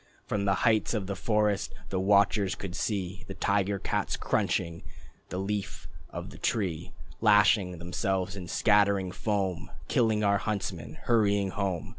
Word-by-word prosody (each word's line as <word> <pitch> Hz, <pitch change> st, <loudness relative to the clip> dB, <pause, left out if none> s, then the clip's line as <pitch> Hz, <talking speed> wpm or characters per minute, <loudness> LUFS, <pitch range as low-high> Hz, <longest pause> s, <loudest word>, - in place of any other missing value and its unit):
From 100 Hz, -1 st, -1 dB
the 95 Hz, -1 st, +3 dB
heights 115 Hz, 0 st, +3 dB
of 105 Hz, -3 st, -1 dB
the 100 Hz, +1 st, -3 dB
forest 105 Hz, 0 st, 0 dB
the 95 Hz, -, -1 dB
watchers 100 Hz, 0 st, +3 dB
could 95 Hz, -2 st, -6 dB
see 95 Hz, -3 st, -2 dB
The 95 Hz, -, -7 dB
tiger 100 Hz, 0 st, +1 dB
cats -, -, -2 dB
crunching 85 Hz, 0 st, -1 dB, 0.5 s
the 90 Hz, -, -4 dB
Leaf 100 Hz, +1 st, -3 dB, 0.2 s
of -, -, -7 dB
the -, -, -12 dB
Tree 90 Hz, -7 st, -1 dB, 0.3 s
Lashing 105 Hz, -3 st, +4 dB
themselves, 95 Hz, +2 st, -2 dB
and 90 Hz, -3 st, -7 dB
scattering 100 Hz, -3 st, +3 dB
foam, 95 Hz, -5 st, -2 dB, 0.2 s
Killing 110 Hz, -3 st, +2 dB
our 100 Hz, -1 st, +3 dB
huntsmen, 90 Hz, -8 st, -4 dB
hurrying 100 Hz, -4 st, +2 dB
home. 95 Hz, -4 st, -2 dB
100 Hz, 145 wpm, -29 LUFS, 95-105 Hz, 0.5 s, Lashing